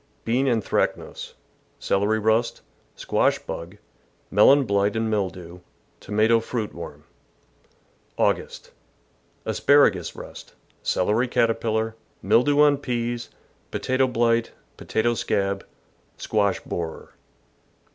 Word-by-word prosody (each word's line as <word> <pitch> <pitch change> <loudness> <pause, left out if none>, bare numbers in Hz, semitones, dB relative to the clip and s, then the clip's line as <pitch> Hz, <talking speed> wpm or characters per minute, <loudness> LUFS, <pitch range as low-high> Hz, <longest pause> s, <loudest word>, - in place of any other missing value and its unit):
— - - -39
Bean 125 +4 +1
anthracnose, 115 -4 -1 0.4
celery 105 +3 +1
rust, 110 +2 0 0.3
squash - - +1
bug, 85 +5 -8 0.5
melon 135 +8 +6
blight 100 -1 +1
and 110 0 -1
mildew, 90 -4 -3 0.4
tomato 110 +3 +2
fruit 115 -1 -4
worm. - - -9 1.1
August. - - -1 0.4
— - - -39
Asparagus 120 - +3
rust, - - -11 0.3
celery 110 +7 +1
caterpillar, 115 -2 0 0.3
mildew 145 +5 +4
on 145 -2 +5
peas, 120 -3 -3 0.4
potato 130 0 0
blight, 115 -1 +1 0.3
potato 120 +2 0
scab, 100 -3 -1 0.5
squash 100 -2 0
borer. 80 -2 -6
110 Hz, 95 wpm, -24 LUFS, 100-120 Hz, 1.1 s, melon